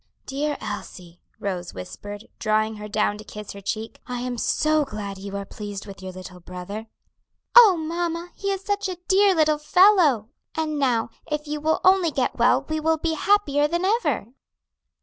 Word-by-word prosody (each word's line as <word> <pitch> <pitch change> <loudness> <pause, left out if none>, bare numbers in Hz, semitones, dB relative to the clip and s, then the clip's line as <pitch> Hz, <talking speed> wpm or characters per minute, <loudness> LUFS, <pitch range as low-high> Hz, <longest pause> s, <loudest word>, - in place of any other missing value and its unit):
"Dear 290 +2 -2
Elsie," 180 -4 -7 0.2
Rose 180 - -4
whispered, 205 - -8
drawing 215 0 +1
Her 210 0 -7
down 210 -1 0
to - - -8
kiss 210 0 -8
her 200 - -9
cheek, 220 +3 -4
"I 250 -1 -3
am 250 0 -3
so 310 +4 +2
glad 205 -7 -6
you 200 0 -5
are 200 - -5
pleased 205 -1 -7
with 195 -2 -10
your 190 0 -6
little 185 0 -10
brother." 180 +5 -7 0.7
"Oh, 440 -7 +9
mamma, 335 +2 -3
he 395 - -3
is 390 0 -3
such 405 0 -1
a 365 - -4
dear 390 0 +5
little 305 -2 +3
fellow!" 370 +5 +6
Elsie 305 - +7
answered 225 -4 -4 0.3
eagerly; 310 - -3
"and 295 - -2
now, 240 -5 +1 0.2
if 300 0 -2
you 300 0 -4
will 315 +1 +1
only 375 -2 +5
get 270 -4 -1
well 250 +3 +3
we 315 0 -1
will 320 +1 +2
be 325 +1 -1
happier 300 -5 +3
than 345 +4 -1
ever." 330 - +1
270 Hz, 190 wpm, -24 LUFS, 205-330 Hz, 0.7 s, Oh